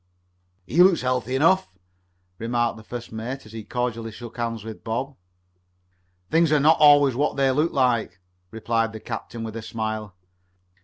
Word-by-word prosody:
"He 160 Hz, -, +3 dB
looks 185 Hz, -1 st, +5 dB
healthy 125 Hz, 0 st, -1 dB
enough," 175 Hz, +7 st, +3 dB, 0.7 s
remarked 120 Hz, +1 st, 0 dB
the 110 Hz, -, -12 dB
first 120 Hz, +1 st, -8 dB
mate 115 Hz, +4 st, -6 dB
as 110 Hz, -, -13 dB
he 110 Hz, -1 st, -7 dB
cordially 115 Hz, 0 st, -3 dB
shook 115 Hz, +1 st, -10 dB
hands 115 Hz, -2 st, -3 dB
with 110 Hz, -1 st, -9 dB
Bob. 130 Hz, +5 st, -3 dB, 1.2 s
"Things 165 Hz, -1 st, +3 dB
are 150 Hz, -, +4 dB
not 155 Hz, +3 st, +4 dB
always 145 Hz, -2 st, +6 dB
what 145 Hz, +3 st, 0 dB
they 135 Hz, -1 st, +3 dB
look 150 Hz, +5 st, +1 dB
like," 120 Hz, -, +1 dB, 0.3 s
replied 115 Hz, +1 st, -1 dB
the 110 Hz, -, -7 dB
captain 115 Hz, 0 st, -6 dB
with 110 Hz, -1 st, -6 dB
a 115 Hz, -, -5 dB
smile. 110 Hz, -3 st, -4 dB
120 Hz, 160 wpm, -24 LUFS, 110-135 Hz, 1.2 s, always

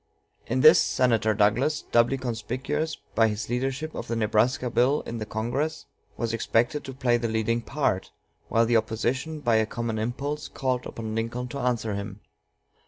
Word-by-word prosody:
In 130 Hz, +2 st, 0 dB
this -, -, +8 dB
Senator 115 Hz, -4 st, +2 dB
Douglas, 115 Hz, +9 st, +2 dB
doubly 120 Hz, +3 st, +4 dB
conspicuous 125 Hz, +6 st, -3 dB, 0.2 s
by 115 Hz, -1 st, +4 dB
his 105 Hz, +1 st, -3 dB
championship 135 Hz, +5 st, -2 dB
of -, -, -6 dB
the 115 Hz, -, -2 dB
Nebraska 115 Hz, +3 st, +1 dB
Bill 130 Hz, +5 st, +3 dB
in 115 Hz, -2 st, -5 dB
Congress, 120 Hz, +9 st, -2 dB, 0.3 s
was 115 Hz, -1 st, -2 dB
expected 120 Hz, +5 st, +1 dB
to 135 Hz, -, -6 dB
play 120 Hz, -2 st, +2 dB
the 120 Hz, 0 st, -2 dB
leading 110 Hz, +1 st, 0 dB
part, 125 Hz, -8 st, -1 dB, 0.4 s
while 115 Hz, +1 st, +3 dB
the 115 Hz, 0 st, +4 dB
opposition, 125 Hz, +8 st, -2 dB
by 120 Hz, -5 st, +3 dB
a 110 Hz, -1 st, +2 dB
common 115 Hz, -1 st, -3 dB
impulse, 140 Hz, +7 st, -3 dB
called 130 Hz, -2 st, -2 dB
upon 110 Hz, -1 st, -6 dB
Lincoln 115 Hz, +3 st, -3 dB
to 140 Hz, -, -5 dB
answer 120 Hz, -4 st, 0 dB
him. 100 Hz, 0 st, -6 dB
120 Hz, 165 wpm, -26 LUFS, 110-130 Hz, 0.4 s, this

